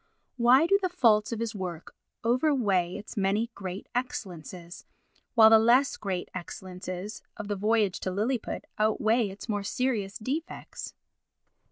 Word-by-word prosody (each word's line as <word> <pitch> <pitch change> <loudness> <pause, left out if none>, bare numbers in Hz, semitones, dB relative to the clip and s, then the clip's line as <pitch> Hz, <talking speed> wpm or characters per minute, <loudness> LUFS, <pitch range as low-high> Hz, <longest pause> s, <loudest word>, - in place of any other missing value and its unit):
Why 250 +5 +6
do 395 +3 +4
the 370 - 0
faults 225 -11 +3
of 230 - -3
his 230 -1 -2
work 180 -5 -6 0.3
overweigh 230 - +2
its 210 - -8
many 210 +4 0
great 190 -1 -6
excellences, 180 - -5 0.5
while 220 -2 +8
the 225 - +9
less 245 +5 +4
great 190 -3 -3
excellences 185 +2 -6 0.2
of 210 - -6
the 205 - -1
Voyage 210 -1 +1
to - - -3
Lilliput 220 +6 -2
outweigh 220 +1 +2
its 195 +4 -9
more 205 -2 -1
serious 210 -2 -1
defects? 290 +10 -5
215 Hz, 140 wpm, -28 LUFS, 190-240 Hz, 0.5 s, the